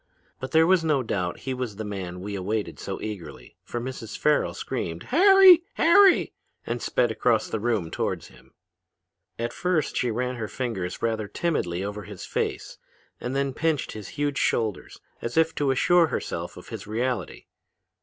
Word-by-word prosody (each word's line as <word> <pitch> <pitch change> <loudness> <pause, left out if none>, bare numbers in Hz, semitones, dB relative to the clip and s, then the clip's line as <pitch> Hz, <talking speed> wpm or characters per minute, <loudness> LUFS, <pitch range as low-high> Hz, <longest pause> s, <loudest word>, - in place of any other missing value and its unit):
But 130 - -5
there 160 0 +5
was 185 -1 +4
no 150 -5 +2
doubt 90 -6 -2
he 130 - -3
was 125 -5 -4
the 110 - -5
man 95 -3 -5
we 100 +2 -5
awaited 100 +2 -3
so - - -5
eagerly, 80 - -8
for 120 - -4
Mrs. 120 -3 -6
Farrel 150 0 +2
screamed 85 0 -4
'Harry! 380 +2 +7
Harry!' 375 +3 +5 0.3
and 120 +1 -3
sped 120 -2 +1
across 110 0 +1
the 110 - -3
room 105 -7 -1
towards - - -3
him. - - -20 0.8
"At 120 +1 -3
first 180 -4 0
she 125 - +1
ran 125 +2 -2
her 110 -2 -3
fingers 100 -8 -4
rather 110 -2 0
timidly 95 - -1
over 105 +1 -4
his 100 -2 -9
face, - - -3 0.4
and 125 +2 -4
then 140 -1 0
pinched 160 -1 0
his 105 -2 -8
huge 145 -1 0
shoulders, 110 -4 -1 0.2
as 120 +5 -4
if 160 0 +4
to 145 -2 0
assure 170 +6 +4
herself - - -4
of - - -12
his - - -7
reality. 115 -2 -2
120 Hz, 170 wpm, -25 LUFS, 105-145 Hz, 0.8 s, Harry